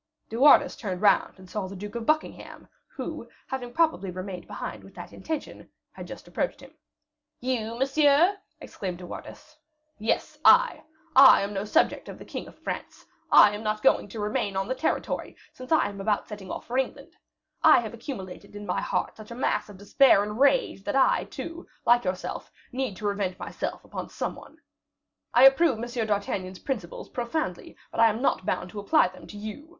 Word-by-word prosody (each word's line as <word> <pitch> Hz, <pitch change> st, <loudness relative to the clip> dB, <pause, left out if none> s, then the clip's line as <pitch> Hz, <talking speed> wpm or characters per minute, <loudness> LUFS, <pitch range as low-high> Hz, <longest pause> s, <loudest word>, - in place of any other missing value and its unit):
De 225 Hz, -, -6 dB
Wardes 280 Hz, +5 st, +6 dB
turned 190 Hz, -5 st, -4 dB
round, 205 Hz, -, +3 dB
and 190 Hz, -1 st, -14 dB
saw 195 Hz, 0 st, -4 dB
the 195 Hz, -, -9 dB
Duke 205 Hz, +2 st, -7 dB
of 235 Hz, -1 st, -5 dB
Buckingham, 310 Hz, 0 st, -2 dB, 0.2 s
who, -, -, -7 dB, 0.2 s
having 250 Hz, -2 st, -5 dB
probably 315 Hz, -, +1 dB
remained 185 Hz, 0 st, -7 dB
behind -, -, -6 dB
with -, -, -15 dB
that -, -, -9 dB
intention, 315 Hz, -2 st, -6 dB, 0.2 s
had -, -, -10 dB
just -, -, -10 dB
approached -, -, -2 dB
him. -, -, -15 dB, 0.7 s
"You, 235 Hz, -3 st, -2 dB
monsieur?" 290 Hz, +7 st, +4 dB, 0.2 s
exclaimed 185 Hz, -3 st, -6 dB
De 180 Hz, -, -10 dB
Wardes. 305 Hz, -, -10 dB, 0.4 s
"Yes, 220 Hz, +2 st, -1 dB
I! -, -, +6 dB, 0.3 s
I 265 Hz, 0 st, +9 dB
am 200 Hz, +1 st, -4 dB
no 195 Hz, +1 st, -3 dB
subject 210 Hz, -, +1 dB
of -, -, -8 dB
the -, -, -12 dB
king -, -, -6 dB
of -, -, -15 dB
France; -, -, -6 dB, 0.3 s
I 210 Hz, -, +8 dB
am 205 Hz, -, -5 dB
not 215 Hz, -1 st, -2 dB
going -, -, +4 dB
to 215 Hz, +2 st, -8 dB
remain 205 Hz, -1 st, -1 dB
on 195 Hz, 0 st, -1 dB
the 260 Hz, -, 0 dB
territory, 260 Hz, +5 st, -2 dB, 0.2 s
since 255 Hz, +3 st, -11 dB
I 315 Hz, -, +4 dB
am 200 Hz, -1 st, -7 dB
about 205 Hz, +1 st, 0 dB
setting 205 Hz, -3 st, -9 dB
off -, -, -6 dB
for 250 Hz, +2 st, -1 dB
England. 280 Hz, +5 st, -4 dB, 0.5 s
I -, -, +8 dB
have 220 Hz, -2 st, -6 dB
accumulated 205 Hz, -6 st, -8 dB
in 205 Hz, 0 st, -7 dB
my -, -, -1 dB
heart -, -, -2 dB
such 215 Hz, -1 st, -11 dB
a 235 Hz, -, -7 dB
mass 245 Hz, -, -1 dB
of 205 Hz, -, -11 dB
despair 200 Hz, +2 st, +4 dB
and 210 Hz, +2 st, -5 dB
rage, 285 Hz, -, +3 dB
that 305 Hz, -, -2 dB
I, 265 Hz, -1 st, +3 dB
too, 335 Hz, +1 st, -8 dB, 0.2 s
like 240 Hz, -1 st, +4 dB
yourself, 185 Hz, 0 st, -4 dB, 0.2 s
need 250 Hz, -6 st, -3 dB
to 210 Hz, -, -7 dB
revenge 200 Hz, -3 st, -1 dB
myself -, -, -5 dB
upon -, -, -6 dB
some -, -, -3 dB
one. -, -, -14 dB, 0.7 s
I 245 Hz, -, +5 dB
approve 270 Hz, -1 st, +5 dB
M. 235 Hz, 0 st, -3 dB
d'Artagnan's 200 Hz, -3 st, -2 dB
principles 210 Hz, -10 st, -5 dB
profoundly, 250 Hz, +6 st, -4 dB
but -, -, -6 dB
I 230 Hz, -, +7 dB
am 220 Hz, +1 st, -2 dB
not 240 Hz, -7 st, 0 dB
bound 180 Hz, -, -2 dB
to 210 Hz, -, -6 dB
apply 205 Hz, -, +3 dB
them 185 Hz, -, -14 dB
to 205 Hz, -, -10 dB
you. 215 Hz, +9 st, -8 dB
220 Hz, 195 wpm, -26 LUFS, 200-265 Hz, 0.7 s, I